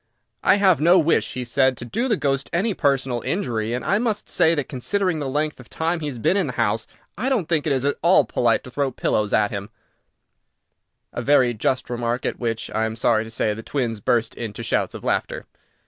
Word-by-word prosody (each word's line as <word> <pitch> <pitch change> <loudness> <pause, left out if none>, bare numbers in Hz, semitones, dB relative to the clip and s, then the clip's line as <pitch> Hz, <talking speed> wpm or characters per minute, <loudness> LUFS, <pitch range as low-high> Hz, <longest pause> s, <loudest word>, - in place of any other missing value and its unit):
"I 190 - +5
have 190 -6 +3
no 175 +4 +6
wish," 165 -1 +2
he 130 - -3
said, 130 +1 +2
"to 120 - -7
do 235 - -1
the 220 -5 +1
ghost 135 -3 -1
any 200 +6 +1
personal 135 -6 0
injury, 115 - -2
and 120 -1 -3
I 200 - +2
must 225 -3 -2
say 165 +1 +3
that, 145 -3 -2
considering 180 +6 -1
the 140 -2 -3
length 150 +2 -2
of 125 - -14
time 165 +1 -1
he 150 - -4
has 135 -4 -5
been 115 - +1
in 190 -6 +1
the 125 - -4
house, 110 -1 0 0.3
I 255 +4 0
don't 225 - 0
think 160 -3 0
it - - +1
is 135 -1 0
at 145 - +1
all 170 -4 +5
polite 115 0 +1
to 125 - -11
throw 140 +1 0
pillows 105 -4 -1
at 105 -1 +2
him," 100 0 -5 1.4
a - - -3
very 130 -2 +3
just 130 +4 -1
remark, 120 0 -2
at - - -2
which, 115 -2 -3
I 110 - 0
am 110 0 -3
sorry 115 -1 +2
to 110 - -9
say, 110 -1 0
the 110 - -7
twins 115 -3 -2
burst 115 +2 +1
into 115 0 -6
shouts - - -1
of - - -8
laughter. - - -2
130 Hz, 225 wpm, -22 LUFS, 115-165 Hz, 1.4 s, no